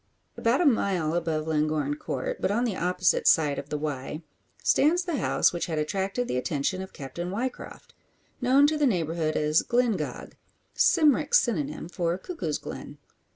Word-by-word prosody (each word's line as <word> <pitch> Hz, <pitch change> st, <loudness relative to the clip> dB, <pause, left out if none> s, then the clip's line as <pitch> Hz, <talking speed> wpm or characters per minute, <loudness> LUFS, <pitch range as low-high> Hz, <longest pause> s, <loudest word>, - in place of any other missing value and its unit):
About 235 Hz, +7 st, +1 dB
a -, -, +2 dB
mile 190 Hz, -, +2 dB
above 160 Hz, -3 st, -1 dB
Llangorren 155 Hz, -, 0 dB
Court, -, -, -4 dB
but -, -, +1 dB
on 220 Hz, +4 st, +1 dB
the 230 Hz, -6 st, -1 dB
opposite 180 Hz, 0 st, +1 dB
side 150 Hz, -3 st, +4 dB
of -, -, -9 dB
the 150 Hz, -, -2 dB
Wye, 150 Hz, +1 st, -4 dB, 0.4 s
stands 340 Hz, +5 st, +3 dB
the 345 Hz, -5 st, -2 dB
house -, -, +2 dB
which 175 Hz, -, -2 dB
had 160 Hz, -2 st, -3 dB
attracted 195 Hz, +9 st, -1 dB
the 125 Hz, -, -1 dB
attention 150 Hz, +7 st, -1 dB
of 190 Hz, -, -8 dB
Captain 150 Hz, +6 st, -6 dB
Ryecroft; 240 Hz, +7 st, -5 dB, 0.5 s
known 260 Hz, +3 st, +5 dB
to 305 Hz, +1 st, +1 dB
the 290 Hz, -, +4 dB
neighbourhood 165 Hz, -, -1 dB
as 150 Hz, +1 st, +3 dB
"Glyngog" 240 Hz, -4 st, -1 dB, 0.4 s
Cymric 305 Hz, -, +3 dB
synonym 160 Hz, -, +1 dB
for 175 Hz, 0 st, -2 dB
"Cuckoo's 185 Hz, -, -4 dB
Glen." -, -, -9 dB
180 Hz, 160 wpm, -27 LUFS, 155-250 Hz, 0.5 s, known